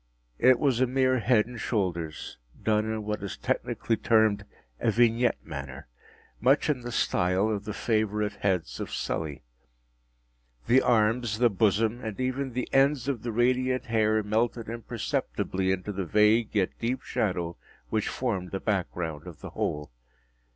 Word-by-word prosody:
It 125 0 +6
was 130 -2 +1
a 130 - +4
mere 130 0 +2
head 115 -2 +3
and 120 0 -9
shoulders, 85 - -2 0.2
done 110 0 +1
in 110 -1 -3
what 105 0 -3
is 100 - -5
technically 115 - -1
termed 110 -2 +3 0.3
a 115 - +1
vignette 120 +1 +2
manner; 70 -5 -7 0.5
much 135 +5 +3
in 130 -4 -3
the 120 0 -6
style 95 -1 +1
of 105 -1 -3
the 105 - -4
favorite 105 -2 0
heads 90 -11 -1
of - - -4
Sully. 75 -4 -3 1.2
The 125 +3 +5
arms, 115 -1 +2
the 120 0 +4
bosom, 110 +4 +1
and 110 -1 -5
even 130 0 -2
the 125 0 -2
ends 135 -1 +3
of 135 -6 -1
the 120 - -3
radiant 130 +2 +1
hair 110 -1 +2
melted 115 +2 -1
imperceptibly 95 -4 -2
into 95 +2 -2
the 95 -2 -3
vague 105 +5 +4
yet 95 -3 +2
deep 125 +3 -2
shadow 90 -4 -2 0.3
which 110 -1 0
formed 100 -8 -2
the 95 - -3
back 95 -4 0
ground 80 -2 -5
of 85 -4 -10
the - - -8
whole. 75 -3 -3
110 Hz, 160 wpm, -27 LUFS, 95-120 Hz, 1.2 s, It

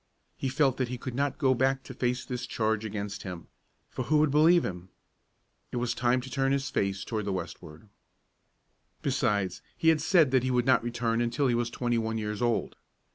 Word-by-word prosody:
He 135 - -2
felt 135 -1 +2
that 130 - 0
he 125 +1 -4
could 125 0 -6
not 140 +2 -1
go 130 -3 +3
back 135 +1 +1
to 130 - -9
face 125 0 -1
this 125 -1 -4
charge 110 -1 0
against 105 -1 -4
him, 90 -3 -7 0.5
for 130 - -4
who 155 +4 +3
would 150 -1 +3
believe 160 +4 +5
him? 90 0 -6 0.8
It - - -3
was 120 0 0
time 125 +1 +1
to 130 - -9
turn 135 0 +1
his 140 0 -1
face 100 -1 -1
to 110 -2 -2
the 100 -1 -3
westward. 85 0 -7 1.2
Besides, 105 -9 0 0.2
he 160 - +3
had 160 -2 +3
said 160 -4 +4
that 130 -1 +4
he 130 - -1
would 125 -1 +2
not 130 -3 +4
return 120 -1 -1
until 120 +4 0
he 125 - +3
was 120 0 0
twenty 120 -1 -1
one 110 0 -2
years 105 -1 -3
old. 120 -1 0
120 Hz, 205 wpm, -28 LUFS, 110-135 Hz, 1.2 s, believe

